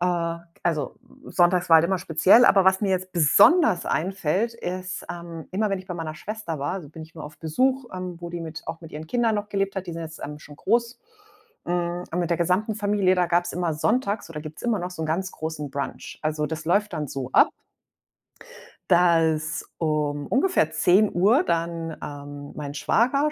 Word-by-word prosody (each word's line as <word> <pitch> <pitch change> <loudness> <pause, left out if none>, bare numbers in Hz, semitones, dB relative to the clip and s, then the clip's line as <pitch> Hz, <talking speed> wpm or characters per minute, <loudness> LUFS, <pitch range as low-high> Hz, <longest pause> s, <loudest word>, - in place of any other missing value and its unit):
Äh, 180 - +1
k 170 -1 -1 0.2
also, 155 -6 -1 0.3
Sonntags 175 0 +2
war 165 - +9
halt 160 - +3
immer 190 +1 +1
speziell, 185 +7 +5
aber 195 -5 +6
was 190 0 +4
mir 200 -2 0
jetzt 185 0 -2
besonders 180 - +5
einfällt, 190 +5 0
ist, 185 -3 -5
ähm, 170 -2 -8
immer, 210 +3 0
wenn 195 -1 -2
ich 185 - -16
bei 180 - -4
meiner 160 -2 -5
Schwester 205 -6 -5
war 145 +5 -1
also, 175 -7 -7
bin 160 0 -9
ich 160 +1 -14
nur - - -7
auf 150 +1 -11
Besuch, 255 - 0
ähm, 185 -2 -6
wo 170 - -6
die 170 0 -5
mit 160 -1 -7
auch 165 +1 -5
mit 165 -2 -12
ihren 155 +1 -7
Kindern 230 0 +1
noch 205 0 -3
gelebt 195 -1 -1
hat. 190 -2 -5
Die - - -3
sind 165 0 -5
jetzt, 160 0 -9
ähm, 150 +1 -7
schon 150 0 -13
groß. 235 - 0 0.7
Hm, 175 0 -1
und 175 - -1
mit 175 - 0
der 170 - +2
gesamten 185 +6 +1
Familie, 205 -3 +2
da 180 - +2
gab's 175 +1 +1
immer 175 -2 0
Sonntags- 205 - 0
oder 150 -2 -6
gibt's 155 0 -9
immer 235 -3 +1
noch- 180 0 -4
so 180 -3 -8
'n - - -2
ganz 180 +4 -2
großen 155 -2 -5
Brunch. 140 +1 -5
Also, 155 0 -1
das 160 0 -6
läuft 205 +4 +2
dann 150 -2 -3
so 130 -1 -5
ab - - +6 1.4
dass 160 -3 +3
um 150 -2 -1
ungefähr 265 - +2
10:00 200 - +4
dann, 165 - -2
ähm, 145 0 -8
mein 145 -1 -5
Schwager 275 - +2
175 Hz, 205 wpm, -24 LUFS, 160-195 Hz, 1.4 s, war